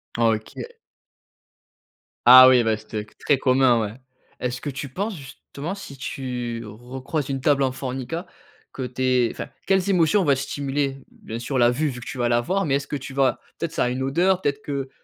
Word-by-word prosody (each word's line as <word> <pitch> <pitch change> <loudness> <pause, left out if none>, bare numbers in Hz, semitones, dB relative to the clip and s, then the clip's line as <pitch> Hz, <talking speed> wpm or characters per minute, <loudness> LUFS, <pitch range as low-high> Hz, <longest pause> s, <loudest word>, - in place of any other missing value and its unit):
Ah, 115 -1 +3
OK. 110 0 -6 1.6
Ah, 130 +1 +11
oui, 125 -2 +5
bah, 110 -1 +2
c'était 110 -1 -6
que 105 - -23
très 145 - +2
commun, 130 -3 +3
ouais. 105 -1 -3 0.5
Est-ce 125 0 -3
que 145 - -4
tu 140 0 -6
penses 200 - -3
justement, 140 +4 -8
si 170 -9 -10
tu 125 -3 -4
recroises 130 +7 -5
une 135 -1 -2
table 140 0 +3
en 130 - +1
Formica 130 +6 -5 0.5
que 135 - -5
tu 125 +1 -6
es 125 -2 +3
enfin, - - -6 0.2
quelles 190 0 +2
émotions 185 +2 +3
vont 145 - +3
être 135 - +3
stimulées? 140 0 -2
Bien 115 +1 -8
sûr, 125 +3 -3
la 120 -1 +5
vue, 150 +5 0
vu 125 -2 -6
que 120 - -10
tu 135 - -6
vas 120 -1 +1
la 120 0 +3
voir, 190 +9 0
mais 140 -3 +1
est-ce 140 0 -2
que 150 - -4
tu 135 0 -7
vas, 135 -1 +2 0.2
peut-être, 170 -2 -3
ça - - 0
a - - 0
une 130 +1 -2
odeur, 180 +7 +2
peut-être 145 -4 -1
que 140 -2 -4
135 Hz, 210 wpm, -23 LUFS, 125-145 Hz, 1.6 s, Ah